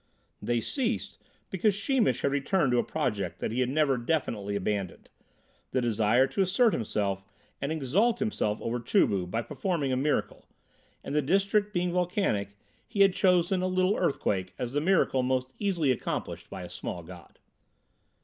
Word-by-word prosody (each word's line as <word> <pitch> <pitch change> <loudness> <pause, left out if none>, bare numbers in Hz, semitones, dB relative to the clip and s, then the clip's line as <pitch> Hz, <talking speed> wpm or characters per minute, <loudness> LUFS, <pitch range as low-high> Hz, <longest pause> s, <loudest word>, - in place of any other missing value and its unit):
They 120 -1 0
ceased 245 - -2 0.3
because 195 +2 +2
Sheemish 200 - +1
had 140 - +1
returned 145 +1 +1
to 120 - +3
a - - +2
project 100 -8 -2
that - - -2
he 120 - -2
had 125 -1 +1
never 140 -2 +2
definitely 115 -7 -1
abandoned, 100 -2 -3 0.6
the 130 - 0
desire 115 +1 +3
to 135 +8 -1
assert 200 +5 +3
himself 100 -3 -1 0.4
and 140 +2 -2
exalt 170 - +1
himself 155 - -1
over 120 +1 -1
Chu 115 - +3
bu 95 -3 -1
by 115 +6 -2
performing 145 - -2
a - - +2
miracle, 145 +3 -1 0.6
and - - -5
the 150 - +3
district 195 +7 +2
being 175 -2 0
volcanic 175 - -1 0.3
he 205 -3 -1
had 195 -1 +6
chosen 180 0 +3
a 185 - 0
little 185 +2 +2
earthquake 100 - -1
as 125 0 -4
the 145 - +1
miracle 165 -6 +2
most 130 0 -1
easily 175 -9 +1
accomplished 125 - -4
by - - -7
a 90 - -8
small 90 -1 -5
god. 90 +1 -13
135 Hz, 170 wpm, -28 LUFS, 115-185 Hz, 0.6 s, had